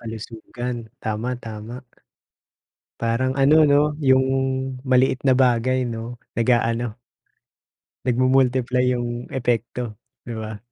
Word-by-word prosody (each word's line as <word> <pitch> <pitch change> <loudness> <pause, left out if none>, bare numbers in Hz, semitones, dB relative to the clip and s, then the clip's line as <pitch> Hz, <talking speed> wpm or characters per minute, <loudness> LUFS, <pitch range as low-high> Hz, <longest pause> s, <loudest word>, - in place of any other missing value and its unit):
Kalusugan, 115 +2 -6 0.3
tama, 110 +3 -2
tama. 110 0 -8 1.2
Parang 115 +3 +1
ano 140 +3 +5
'no, 145 -1 +5 0.2
yung 130 -1 +4 0.6
maliit 130 0 +2
na 135 -2 +4
bagay 130 0 +2
'no, 115 +1 -6 0.2
nag-aano, 115 -1 +1 1.1
nagmu-multiply 130 0 +2
yung 120 0 -4
epekto, 120 -2 -2 0.3
'di 120 - -5
ba? 110 -1 -6
120 Hz, 95 wpm, -22 LUFS, 115-130 Hz, 1.2 s, ano